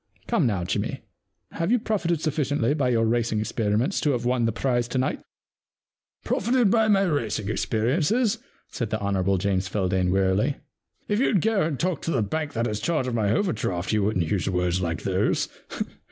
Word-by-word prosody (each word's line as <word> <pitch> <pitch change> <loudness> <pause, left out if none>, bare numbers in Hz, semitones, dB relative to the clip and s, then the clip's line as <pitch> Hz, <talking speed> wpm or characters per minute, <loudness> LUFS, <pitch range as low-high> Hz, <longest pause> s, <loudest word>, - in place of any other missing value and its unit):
Come - - +2
now, 100 -6 -1
Jimmy, 85 - -2 0.5
have 165 +5 -1
you 245 - +5
profited 180 -8 -1
suffi 155 -1 0
ciently 145 -1 +1
by 135 -4 +1
your 115 -2 +2
racing 115 -1 +1
experiences 110 - 0
to 145 - +2
have 120 -1 -2
won 125 -1 +2
the 115 - +2
prize 120 +1 0
to 125 - -3
night? 130 - 0 1.0
Profited 235 -1 +2
by 225 -1 +4
my 200 -2 +4
racing 115 - -1
experiences? 165 - +1 0.2
' - - -37
said 115 -5 -3
the 110 - -1
Hon. 100 -2 0
James 95 0 0
Feldane 95 -2 0
wearily. 95 +8 +2 0.3
* - - -45
If 205 +1 +1
you*d 235 -6 +3
g© 205 -8 +2
and 145 -5 -4
talk 175 -4 -1
to 165 - -2
the 125 -8 +1
bank 150 +7 -3
that 115 0 0
has 105 -3 -2
charge 155 +2 0
of 125 - -2
my 105 -3 +1
overdraft 105 - -1
you 105 - +2
wouldn*t 95 -4 +1
use 95 +2 0
words 90 0 0
like 85 -2 -2
those. - - +1
120 Hz, 195 wpm, -25 LUFS, 100-160 Hz, 1.0 s, you